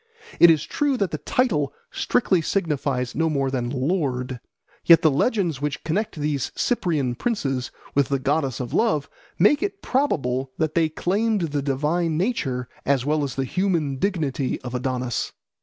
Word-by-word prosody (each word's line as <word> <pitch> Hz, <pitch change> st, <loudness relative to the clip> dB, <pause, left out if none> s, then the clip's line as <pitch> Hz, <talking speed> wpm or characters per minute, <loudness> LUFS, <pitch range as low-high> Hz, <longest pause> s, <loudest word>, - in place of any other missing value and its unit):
It 170 Hz, -, +9 dB
is 155 Hz, -2 st, +4 dB
true 285 Hz, -3 st, 0 dB
that 200 Hz, -6 st, 0 dB
the 155 Hz, -, -3 dB
title 160 Hz, -, +1 dB, 0.2 s
strictly 185 Hz, -7 st, +1 dB
signified 145 Hz, -8 st, -1 dB
no 160 Hz, +2 st, +1 dB
more 135 Hz, -3 st, 0 dB
than 125 Hz, -2 st, -1 dB
"lord"; 130 Hz, -3 st, -1 dB, 0.4 s
yet 170 Hz, -1 st, +7 dB
the 155 Hz, -, +5 dB
legends 170 Hz, -, 0 dB
which 150 Hz, +1 st, -3 dB
connect 210 Hz, +8 st, -1 dB
these 145 Hz, -3 st, -2 dB
Cyprian 155 Hz, -, 0 dB
princes 135 Hz, -, -2 dB, 0.2 s
with 140 Hz, -1 st, +2 dB
the 140 Hz, -, +2 dB
goddess 135 Hz, -1 st, 0 dB
of 125 Hz, -2 st, -5 dB
love 155 Hz, -11 st, +1 dB, 0.3 s
make 285 Hz, -, +4 dB
it 400 Hz, 0 st, -3 dB
probable 135 Hz, -, 0 dB
that 160 Hz, -2 st, 0 dB
they 165 Hz, -2 st, +2 dB
claimed 205 Hz, +6 st, 0 dB
the 150 Hz, -4 st, -1 dB
divine 155 Hz, +4 st, 0 dB
nature 150 Hz, -, -1 dB, 0.2 s
as 135 Hz, -2 st, +1 dB
well 150 Hz, 0 st, +1 dB
as 135 Hz, -3 st, -3 dB
the 135 Hz, -, -1 dB
human 165 Hz, -5 st, 0 dB
dignity 150 Hz, -7 st, -1 dB
of 125 Hz, -1 st, -7 dB
Adonis. 125 Hz, -1 st, -2 dB
150 Hz, 160 wpm, -23 LUFS, 135-180 Hz, 0.4 s, It